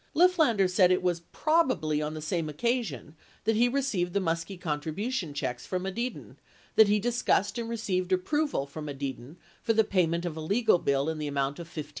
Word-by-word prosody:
Lifflander 315 - +4
said 180 0 +4
it 185 - +2
was 175 -2 +1
"probably" 265 - +1
on 150 +1 -3
the 155 - -6
same 160 0 -1
occasion 175 - -2 0.3
that 225 +1 +2
he 240 +3 +4
re 275 +3 +1
ceived 180 -10 -1
the 200 - +2
Muskie 165 +1 -2
contribution 165 - -3
checks 125 -3 -4
from 185 -1 -2
Edidin, 235 +6 -4 0.4
that 220 - +7
he 205 +1 +3
discussed 235 -2 +1
and 230 -1 -4
received 190 -5 -2
approval 285 - 0
from 150 +2 -8
Edidin 135 0 -6 0.3
for 225 - +1
the 220 0 +4
payment 175 -4 +1
of 170 -3 -3
a 160 - -5
legal 200 +3 +3
bill 140 -1 +1
m 160 -1 -2
the 150 - -3
amount 140 +1 -1
of 170 -1 -8
$1,500. 155 -3 -6
180 Hz, 195 wpm, -28 LUFS, 155-225 Hz, 0.4 s, that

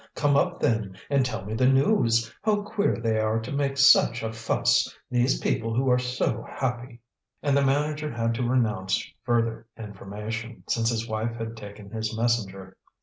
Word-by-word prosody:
Come 145 -1 +2
up, 175 +5 +1
then, 110 -5 0
and 140 -2 +4
tell 110 -6 -4
me 105 - -5
the 125 +3 +2
news. 130 - +3
How 210 -1 +1
queer 205 0 0
they 115 -1 0
are 110 +1 +1
to 115 +2 -7
make 140 -1 -1
such 130 -3 +5
a 110 0 -3
fuss, 115 0 +1
these 125 +1 +2
people 115 0 -1
who 130 +1 +2
are 125 - +4
so 125 -2 -1
happy!" 125 -2 -4 0.4
And 140 -2 +2
the 140 - +3
manager 150 +2 0
had 115 0 -1
to 115 - -2
renounce 105 -7 0
further 115 -1 -1
information, 110 +2 -7
since 115 -1 +1
his 115 -1 -2
wife 110 +1 -2
had 115 0 -5
taken 105 -2 -11
his 110 0 -3
messenger. 100 -5 -1
115 Hz, 175 wpm, -26 LUFS, 110-135 Hz, 0.4 s, such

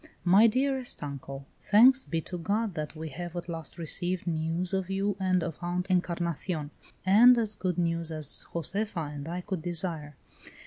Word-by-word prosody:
"MY 195 +6 +6
DEAREST 260 - 0
UNCLE, 140 -1 -7 0.2
Thanks 255 +5 +6
be 165 -1 -2
to 180 +2 -5
God 205 +4 -1
that 155 0 -5
we 160 0 -6
have 175 +4 -7
at 175 0 -5
last 165 -1 -4
received 175 +2 -1
news 165 +2 -1
of 190 -1 -1
you 195 +1 0
and 185 -2 +1
of 165 -2 -5
Aunt 175 +1 -2
Encarnacion, 170 -3 -1 0.3
and 235 +6 +7
as 220 -2 0
good 185 -4 -2
news 170 -1 0
as 155 -3 -1
Josefa 170 -2 -2
and 145 +2 -7
I 175 +1 -3
could 180 -2 -4
desire. 165 -3 -3
175 Hz, 170 wpm, -28 LUFS, 160-195 Hz, 0.3 s, and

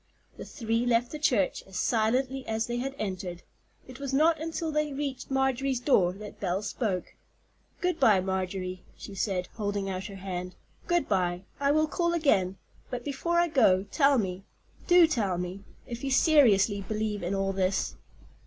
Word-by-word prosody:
The - - -7
three 230 -2 -1
left 240 0 +1
the 305 - -5
church 240 -10 +1
as 190 -1 -7
silently 255 +5 +1
as 220 0 0
they 240 0 -3
had 270 +2 -3
entered. 185 -3 -4 0.4
It 255 0 -11
was 275 -1 -2
not 315 +2 +3
until 325 0 -3
they 300 -1 0
reached 275 -1 -4
Marjorie's 265 -1 +1
door 200 -9 +3
that 210 +2 -10
Belle 190 +1 -1
spoke. 205 -3 -2 0.7
"Good 360 -2 0
by, 220 -8 +5
Marjorie," 185 -1 -3 0.2
she 200 - -9
said, 190 -2 -1
holding 205 -2 -2
out 185 0 -4
her 200 - -7
hand; 185 -1 -5 0.3
"good 345 -1 +1
by. 180 -2 0 0.2
I 280 0 +2
will 310 +1 +3
call 340 +2 0
again. 195 - +2 0.3
But 245 -1 -5
before 315 +5 -1
I 345 0 +4
go, 220 - +4
tell 280 -2 +4
me—do 205 - +1
tell 215 - 0
me—if 195 +7 -7
you 275 - -1
seriously 230 - +4
believe 215 +1 -2
in 175 +3 -2
all 195 0 0
this?" 190 0 0
220 Hz, 165 wpm, -28 LUFS, 190-275 Hz, 0.7 s, by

